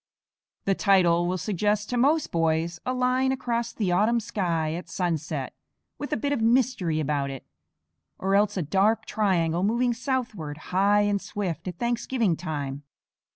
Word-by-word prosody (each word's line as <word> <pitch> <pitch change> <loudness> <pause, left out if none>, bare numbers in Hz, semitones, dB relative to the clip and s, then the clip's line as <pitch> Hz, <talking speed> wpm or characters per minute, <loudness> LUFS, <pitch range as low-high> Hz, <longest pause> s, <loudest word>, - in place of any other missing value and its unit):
The 195 - +3
title 175 -4 +3
will 185 +1 -1
suggest 210 +3 -1
to - - 0
most 290 +6 +2
boys 165 +1 0
a - - +1
line 255 +1 +1
across 235 -3 -2
the 200 -5 -1
autumn 215 +6 +3
sky 175 -9 -1
at 175 +2 -6
sunset, 160 -6 -2 0.5
with 290 - -5
a - - +1
bit 285 +5 -1
of 240 - -1
mystery 225 -9 +2
about 145 -2 -1
it; 135 -1 -8 0.7
or 195 +1 -1
else 205 0 +3
a 180 - 0
dark 195 +8 +2
triangle 175 -5 +1
moving 235 +5 +2
southward, 230 - -3 0.2
high 200 +2 +4
and 205 -1 +1
swift, 185 -5 -4
at 180 -2 -5
Thanksgiving 235 -4 0
time. 145 -3 -4
200 Hz, 155 wpm, -26 LUFS, 165-235 Hz, 0.7 s, high